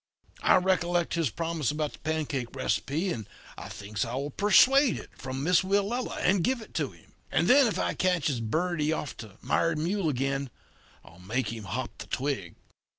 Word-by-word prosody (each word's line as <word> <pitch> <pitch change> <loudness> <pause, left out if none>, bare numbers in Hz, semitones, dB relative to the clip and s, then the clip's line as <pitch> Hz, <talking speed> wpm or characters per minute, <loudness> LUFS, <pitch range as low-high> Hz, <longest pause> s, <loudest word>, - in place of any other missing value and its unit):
I - - +5
recollect 175 -2 +1
his 165 -5 +1
promise 165 0 -2
about 150 0 -2
the - - -13
pancake 150 -5 -2
receipt, 160 +8 -1
and 110 - -5 0.3
I - - -8
thinks 105 +1 -4
I 115 +2 -4
will 140 +2 -3
persuade 255 - +5
it - - -10
from 130 +1 -5
Miss 180 +2 +4
Willella 200 +6 0
and 185 -1 +3
give 255 +4 +1
it 220 - -12
to - - -1
him; - - -20 0.2
and - - +2
then 270 +1 +7
if 220 - -1
I - - 0
catches 165 -8 +1
Birdie 155 +6 0
off 150 -5 -4
of 105 -4 -13
Mired 165 -1 +1
Mule 175 +2 0
again, 135 0 -1 0.6
I'll 85 - -16
make 115 +7 -2
him 110 -3 -7
hop 120 +6 -4
the - - -7
twig. 130 -11 -2
155 Hz, 185 wpm, -28 LUFS, 130-185 Hz, 0.6 s, then